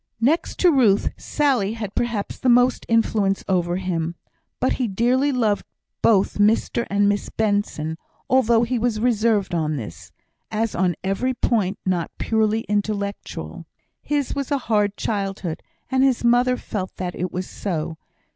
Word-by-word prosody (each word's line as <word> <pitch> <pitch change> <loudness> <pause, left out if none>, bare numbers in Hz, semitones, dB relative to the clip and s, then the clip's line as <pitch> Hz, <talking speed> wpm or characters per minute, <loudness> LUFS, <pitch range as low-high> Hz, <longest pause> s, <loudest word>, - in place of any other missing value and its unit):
Next 285 +9 +1
to 360 - +6
Ruth, 230 -9 +3
Sally 255 -9 0
had 215 -3 -5
perhaps 235 -4 -2
the 255 - +1
most 245 +1 +3
influence 215 -4 +2
over 175 -2 +1
him; 170 -3 -2 0.4
but 255 - +1
he 245 - +1
dearly 245 +7 +2
loved 225 -6 +1 0.4
both 205 -2 +3
Mr 220 +3 +2
and 200 0 +2
Miss 205 0 0
Benson; 205 -7 -1 0.3
although 235 -3 +4
he 240 +1 0
was 225 -2 0
reserved 215 -4 +1
on 155 -2 0
this, 105 - -8 0.4
as 220 0 -1
on 180 -1 +1
every 220 +7 0
point 210 -5 0
not 180 -3 0
purely 220 0 +1
intellectual. 200 - -3 0.3
His 290 -2 -1
was 280 -2 -3
a 285 - +2
hard 205 -1 +2
childhood, 195 -5 -3 0.3
and 260 0 +3
his 265 -3 +2
mother 245 +1 +3
felt 190 -6 -5
that 180 -1 -4
it 180 0 -3
was 185 +1 -4
so. 160 -4 -4
210 Hz, 150 wpm, -22 LUFS, 190-240 Hz, 0.4 s, to